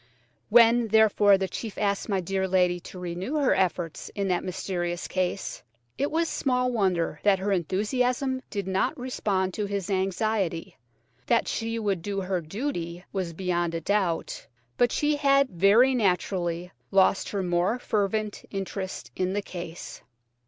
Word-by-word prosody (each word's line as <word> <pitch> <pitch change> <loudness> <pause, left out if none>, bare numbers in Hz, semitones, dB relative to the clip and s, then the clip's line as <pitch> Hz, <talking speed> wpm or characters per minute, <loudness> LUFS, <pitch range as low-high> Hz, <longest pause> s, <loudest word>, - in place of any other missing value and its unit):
When, 235 +1 +6
therefore, 210 -2 +5
the 190 0 -1
chief 210 +3 -6
asked 200 +1 -1
my 195 -2 +1
dear 190 +2 -1
lady 180 -1 +2
to 180 - -11
renew 180 - -4
her 285 -3 +3
efforts 175 -3 -1
in 200 -2 -1
that 180 -1 +1
mysterious 175 -1 -3
case, 185 -3 -2 0.3
it 280 - 0
was 330 +2 +1
small 250 -4 0
wonder 180 -8 0
that 200 -2 +4
her 195 +2 -2
enthusiasm 250 - 0
did 200 -3 -4
not 190 0 0
respond 200 -7 -1
to 210 +1 -2
his 200 -1 -3
anxiety. 190 -2 -1 0.5
That - - +2
she 230 0 -2
would 200 -5 -1
do 195 +2 -3
her 185 -1 -1
duty 175 - -4
was 185 -4 -2
beyond 175 -1 -1
a 165 - -2
doubt, 190 -2 -1 0.3
but 245 -1 +3
she 295 0 +1
had 275 -1 +4
very 205 +9 +5
naturally 180 -5 0 0.2
lost 195 0 +3
her 200 -2 -2
more 180 +5 +1
fervent 210 -2 -1
interest 195 -1 -5
in 185 0 -1
the 205 - 0
case. 175 -3 -8
195 Hz, 150 wpm, -26 LUFS, 180-220 Hz, 0.5 s, When